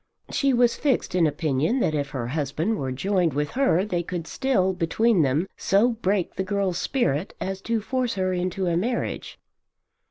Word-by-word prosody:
She 275 Hz, -1 st, +2 dB
was 245 Hz, -1 st, +3 dB
fixed 280 Hz, -10 st, 0 dB
in 175 Hz, -3 st, +4 dB
opinion 155 Hz, -, 0 dB
that 155 Hz, -, +1 dB
if 145 Hz, -2 st, -1 dB
her 120 Hz, -4 st, -4 dB
husband 155 Hz, -, -1 dB
were 130 Hz, -1 st, -2 dB
joined 175 Hz, +2 st, 0 dB
with 150 Hz, 0 st, -1 dB
her 245 Hz, -8 st, +2 dB
they 180 Hz, -5 st, -1 dB
could 170 Hz, -1 st, -5 dB
still, 190 Hz, -5 st, +1 dB
between 185 Hz, +4 st, +2 dB
them, 150 Hz, +6 st, +1 dB
so 205 Hz, +5 st, +3 dB
break 205 Hz, -5 st, -1 dB
the 190 Hz, -, 0 dB
girl's 195 Hz, -2 st, -1 dB
spirit 185 Hz, -, -1 dB
as 190 Hz, 0 st, -4 dB
to 230 Hz, -1 st, +1 dB
force 250 Hz, +1 st, -1 dB
her 185 Hz, -1 st, 0 dB
into 185 Hz, +1 st, -1 dB
a 170 Hz, -1 st, +1 dB
marriage. 235 Hz, +8 st, -2 dB
185 Hz, 180 wpm, -25 LUFS, 160-225 Hz, -, in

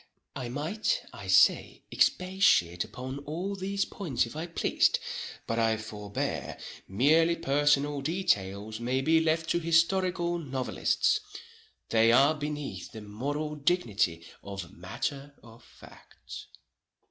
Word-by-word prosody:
I 125 Hz, -2 st, -4 dB
might, 185 Hz, -, -1 dB
I -, -, -9 dB
say, -, -, +4 dB
expatiate 180 Hz, -, +3 dB
upon 130 Hz, +2 st, -7 dB
all 165 Hz, +7 st, -4 dB
these 195 Hz, +1 st, -2 dB
points 145 Hz, -, -1 dB
if 115 Hz, -, -10 dB
I 160 Hz, +2 st, -4 dB
pleased,—but 115 Hz, -7 st, -1 dB
I 115 Hz, -1 st, +2 dB
forbear, 105 Hz, -2 st, -4 dB, 0.3 s
merely 155 Hz, -, +3 dB
personal 145 Hz, 0 st, +1 dB
details 110 Hz, -, -1 dB
may 125 Hz, +3 st, 0 dB
be 160 Hz, +4 st, +4 dB
left 160 Hz, 0 st, 0 dB
to 170 Hz, -, +2 dB
historical 175 Hz, +1 st, +2 dB
novelists,—they 130 Hz, -4 st, -1 dB
are 140 Hz, +5 st, +5 dB
beneath 150 Hz, -, -5 dB
the 110 Hz, -, -9 dB
moral 145 Hz, +9 st, -4 dB
dignity 110 Hz, -, 0 dB, 0.2 s
of 95 Hz, -3 st, -8 dB
matter 140 Hz, +10 st, -5 dB
of 115 Hz, 0 st, -15 dB
fact. -, -, -13 dB
145 Hz, 110 wpm, -29 LUFS, 115-165 Hz, 0.3 s, are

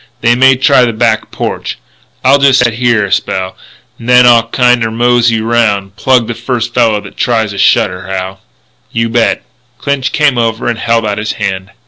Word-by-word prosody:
They 120 Hz, +1 st, +3 dB
may 130 Hz, +2 st, +4 dB
try 135 Hz, 0 st, +3 dB
the 120 Hz, -2 st, 0 dB
back 110 Hz, -1 st, 0 dB
porch. -, -, -5 dB, 0.5 s
I'll 140 Hz, +2 st, +5 dB
jest 135 Hz, -2 st, +4 dB
set 120 Hz, -2 st, 0 dB
here 115 Hz, -3 st, +1 dB
a 100 Hz, -, -7 dB
spell, 95 Hz, 0 st, -2 dB, 0.4 s
n'then 125 Hz, +1 st, +4 dB
I'll 115 Hz, -1 st, +4 dB
kind 125 Hz, 0 st, +2 dB
er 115 Hz, -, -1 dB
mosey 120 Hz, 0 st, +1 dB
'round.... 105 Hz, -4 st, 0 dB
Plug 125 Hz, +1 st, +1 dB
the 120 Hz, -, -4 dB
first 120 Hz, 0 st, -4 dB
fella 115 Hz, -4 st, +2 dB
that -, -, -13 dB
tries 110 Hz, -3 st, 0 dB
a 100 Hz, -, -7 dB
shutter, 90 Hz, 0 st, +1 dB
Hal." 95 Hz, 0 st, -5 dB, 0.5 s
"You 115 Hz, 0 st, -1 dB
bet." 115 Hz, 0 st, 0 dB, 0.3 s
Clinch 140 Hz, -2 st, -2 dB
came 145 Hz, -5 st, +1 dB
over 115 Hz, 0 st, -1 dB
and 120 Hz, -2 st, -2 dB
held 115 Hz, -1 st, 0 dB
out 105 Hz, -1 st, -2 dB
his 110 Hz, 0 st, -3 dB
hand. 95 Hz, 0 st, -4 dB
115 Hz, 185 wpm, -11 LUFS, 110-125 Hz, 0.5 s, I'll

